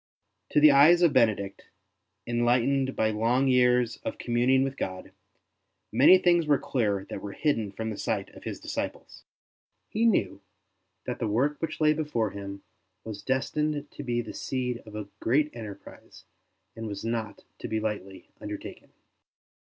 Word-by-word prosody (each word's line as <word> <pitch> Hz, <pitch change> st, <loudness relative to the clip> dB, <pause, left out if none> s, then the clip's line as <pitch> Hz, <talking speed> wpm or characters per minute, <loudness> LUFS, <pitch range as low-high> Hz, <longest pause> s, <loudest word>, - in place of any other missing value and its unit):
To -, -, +3 dB
the 150 Hz, 0 st, +8 dB
eyes 155 Hz, +6 st, +6 dB
of 165 Hz, -5 st, +4 dB
Bene 115 Hz, -5 st, +5 dB
dict, 100 Hz, 0 st, -8 dB, 0.6 s
enlightened 125 Hz, +3 st, +1 dB
by 110 Hz, 0 st, +1 dB
long 120 Hz, +5 st, +1 dB
years 125 Hz, -2 st, +3 dB
of -, -, -6 dB
communing 125 Hz, +2 st, +2 dB
with 135 Hz, 0 st, -3 dB
God, 95 Hz, -7 st, -5 dB, 0.8 s
many 135 Hz, +11 st, +7 dB
things 175 Hz, -3 st, +3 dB
were 145 Hz, -2 st, +4 dB
clear 105 Hz, -8 st, -1 dB
that -, -, -5 dB
were 100 Hz, -1 st, -6 dB
hidden 115 Hz, -9 st, 0 dB
from 110 Hz, +2 st, -4 dB
the 105 Hz, -, -7 dB
sight -, -, -2 dB
of -, -, -14 dB
his -, -, -5 dB
disciples. -, -, -6 dB, 0.6 s
He 225 Hz, +2 st, +2 dB
knew 220 Hz, -, +1 dB, 0.6 s
that -, -, -4 dB
the -, -, -1 dB
work 135 Hz, +8 st, 0 dB
which 165 Hz, -, -3 dB
lay 155 Hz, -1 st, +4 dB
before 145 Hz, -9 st, -1 dB
him 100 Hz, -1 st, -8 dB, 0.4 s
was 110 Hz, -2 st, -7 dB
destined 145 Hz, +3 st, -1 dB
to -, -, -8 dB
be 120 Hz, -2 st, -1 dB
the 115 Hz, -, -8 dB
seed 125 Hz, -2 st, -3 dB
of 105 Hz, -, -10 dB
a 105 Hz, -2 st, -5 dB
great 150 Hz, +5 st, +1 dB
enterprise 105 Hz, -4 st, -11 dB, 0.5 s
and 115 Hz, 0 st, -6 dB
was 100 Hz, 0 st, -6 dB
not 115 Hz, -2 st, -3 dB, 0.2 s
to -, -, -5 dB
be 110 Hz, -, -1 dB
lightly 105 Hz, -3 st, -5 dB
undertaken. -, -, -8 dB
120 Hz, 160 wpm, -27 LUFS, 110-140 Hz, 0.8 s, the